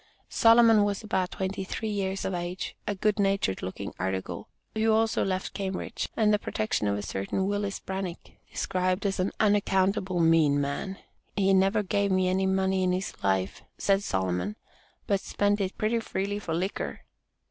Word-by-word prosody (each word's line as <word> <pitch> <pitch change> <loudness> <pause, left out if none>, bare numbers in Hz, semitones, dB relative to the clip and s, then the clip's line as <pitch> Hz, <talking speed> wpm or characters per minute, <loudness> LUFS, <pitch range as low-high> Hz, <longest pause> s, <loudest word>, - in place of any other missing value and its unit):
Solomon 230 -2 +6
was 205 +1 -1
about 190 -4 0
twenty 190 +1 -3
three 215 +3 -3
years 195 -1 -2
of 190 - -1
age, 175 +1 -4
a 205 - 0
good 210 +2 +1
natured 195 - +1
looking 95 +2 -5
"article," 95 +1 -3 0.3
who 220 0 +2
also 220 0 +2
left 185 -1 -2
Cambridge, 195 +3 -3
and 210 -1 +4
the 210 - +3
protection 110 - -1
of 100 0 +1
a 100 - -4
certain 100 - -2
Willis 205 0 -1
Branick, 190 -2 -5 0.2
described 185 +2 -1
as 195 -1 0
an 185 +2 +1
"unaccountable 195 -3 +2
mean 165 -3 +4
man." 145 +7 -3 0.4
"He 195 -1 +3
never 195 +3 +3
gave 200 +1 +1
me 185 -1 +2
any 190 +1 +1
money 190 0 +1
in 185 -1 +2
his 185 +1 -2
life," 95 -1 0 0.2
said 195 0 +2
Sol., 95 - -1 0.5
"but 200 - +1
spent 205 +1 0
it 190 0 -3
pretty 225 +2 +1
freely 205 -2 -2
for 165 -5 -3
liquor." 185 +4 -3
190 Hz, 170 wpm, -28 LUFS, 180-205 Hz, 0.5 s, Solomon